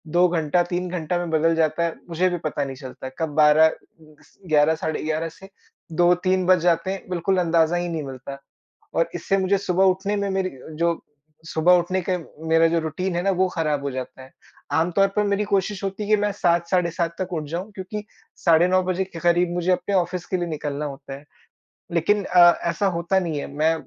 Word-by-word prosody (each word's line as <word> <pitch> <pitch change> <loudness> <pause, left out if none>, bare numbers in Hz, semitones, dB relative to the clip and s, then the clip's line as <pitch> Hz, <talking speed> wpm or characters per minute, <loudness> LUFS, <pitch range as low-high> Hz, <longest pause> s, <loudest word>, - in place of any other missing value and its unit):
2 180 +1 +6
घंटा 170 0 +1
3 180 0 -2
घंटा 175 0 -2
में 175 -1 -3
बदल 165 +1 +2
जाता 160 +1 +1
है, 165 - -1
मुझे 180 +3 +1
भी 175 - -2
पता 150 -2 -3
नहीं 135 -1 -5
चलता। 130 -1 -8
कब 160 -1 -1
12 155 +1 +6 0.5
क्स - - -25
11 155 0 +4
साढ़े 160 0 -3
11 155 +1 -2
से 190 +4 -15 0.4
2-3 180 +2 +2
बज 185 -1 +5
जाते 175 +1 +1
हैं, 195 - -6
बिल्कुल 180 +2 0
अंदाज़ा 170 0 +2
ही 175 0 -2
नहीं 160 -3 -3
मिलता। 135 +1 -8 0.6
और 165 0 +1
इससे 195 +3 0
मुझे 190 +1 +2
सुबह 190 -1 +1
उठने 195 +2 -3
में 200 0 -1
मेरी 190 -1 -1 0.3
जो 170 0 0 0.5
सुबह 165 +2 +3
उठने 185 +2 -1
का 180 - +1 0.3
मेरा 165 0 +4
जो 165 0 +1
रूटीन 170 +3 -3
है 175 - 0
ना 195 - +2
वो 185 0 +2
खराब 150 -4 -1
हो 140 - -2
जाता 130 0 -7
है। 130 - -15 0.4
आम 165 +2 +1
तौर 195 0 +5
पर 210 - +2
मेरी 205 0 0
कोशिश 200 0 -1
होती 195 +2 -3
कि 215 - +5
मैं 205 0 0
7 170 -3 +1
साढ़े 180 -2 +2
7 170 -1 -2
तक 185 -1 -4
उठ 155 -2 -2
जाऊँ 180 +6 -4
क्योंकि 205 +2 -6 0.3
साढ़े 170 +1 +4
9 185 0 +3
बजे 185 +1 -1
के 185 -3 -9
करीब 175 +1 +2
मुझे 175 +1 0
अपने 180 +2 0
ऑफिस 180 0 -1
के 185 - -2
लिए 175 - -2
निकलना 150 -2 -4
होता 140 -1 -7
है। 140 +1 -10 0.7
लेकिन 200 +5 +2
अ, 175 -1 +7 0.2
ऐसा 200 - -1
होता 175 +3 +1
नहीं 165 -5 -3
है। - - -5
मैं 155 +3 +1
175 Hz, 215 wpm, -23 LUFS, 160-185 Hz, 0.7 s, अ